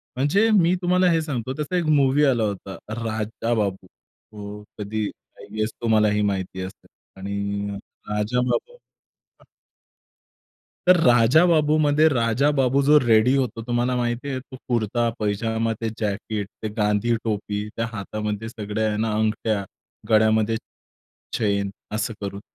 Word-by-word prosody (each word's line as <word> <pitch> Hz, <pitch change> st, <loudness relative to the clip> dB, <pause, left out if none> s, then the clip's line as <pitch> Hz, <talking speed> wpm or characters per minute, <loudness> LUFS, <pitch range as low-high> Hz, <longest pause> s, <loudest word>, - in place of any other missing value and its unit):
म्हणजे 185 Hz, -, +3 dB
मी 175 Hz, +2 st, +3 dB
तुम्हाला 180 Hz, 0 st, +3 dB
हे 165 Hz, -1 st, +2 dB
सांगतो, 130 Hz, -4 st, -3 dB
त्याचा 150 Hz, +5 st, -3 dB
1 175 Hz, -, 0 dB
मूवी 140 Hz, +2 st, +3 dB
आला 125 Hz, -5 st, +2 dB
होता, 100 Hz, -2 st, -4 dB, 0.3 s
राजा 110 Hz, +1 st, -2 dB
बाबू. 100 Hz, -4 st, -1 dB
तो 105 Hz, +1 st, -12 dB
कधी 105 Hz, +1 st, -3 dB, 0.3 s
आय -, -, -10 dB
गेस 110 Hz, 0 st, 0 dB
तुम्हाला 110 Hz, -2 st, +3 dB
ही 105 Hz, 0 st, +1 dB
माहिती 95 Hz, -2 st, -2 dB
असेल 95 Hz, +1 st, -9 dB, 0.3 s
आणि 100 Hz, +1 st, -3 dB, 0.4 s
राजाबाबू. 125 Hz, -, -1 dB, 0.6 s
अ -, -, -21 dB, 1.4 s
तर 180 Hz, -, +8 dB
राजाबाबूमध्ये 150 Hz, +4 st, +4 dB
राजाबाबू 135 Hz, +2 st, +2 dB
जो 150 Hz, +2 st, +6 dB
रेडी 120 Hz, +1 st, +4 dB
होतो, 125 Hz, -4 st, -1 dB
तुम्हाला 120 Hz, +1 st, +1 dB
माहिती 120 Hz, +3 st, -2 dB
आहे. 130 Hz, -, -2 dB
तो 130 Hz, 0 st, -12 dB
कुर्ता-पैजामा, 115 Hz, -1 st, 0 dB
ते 115 Hz, -, -1 dB
जॅकेट, 105 Hz, -1 st, -2 dB, 0.2 s
ते -, -, 0 dB
गांधी 105 Hz, +2 st, +2 dB
टोपी, 105 Hz, -1 st, -2 dB
त्या 115 Hz, -, -1 dB
हातामध्ये 105 Hz, +1 st, -4 dB
सगळ्या 110 Hz, -1 st, -2 dB
आहे 105 Hz, -, -2 dB
ना 110 Hz, -, 0 dB
अंगठ्या, 110 Hz, -1 st, 0 dB, 0.5 s
गळ्यामध्ये 110 Hz, 0 st, +3 dB, 0.8 s
चैन, 100 Hz, -3 st, 0 dB, 0.3 s
असं 110 Hz, +1 st, -2 dB
करून 100 Hz, 0 st, -4 dB
115 Hz, 130 wpm, -23 LUFS, 105-130 Hz, 1.4 s, तर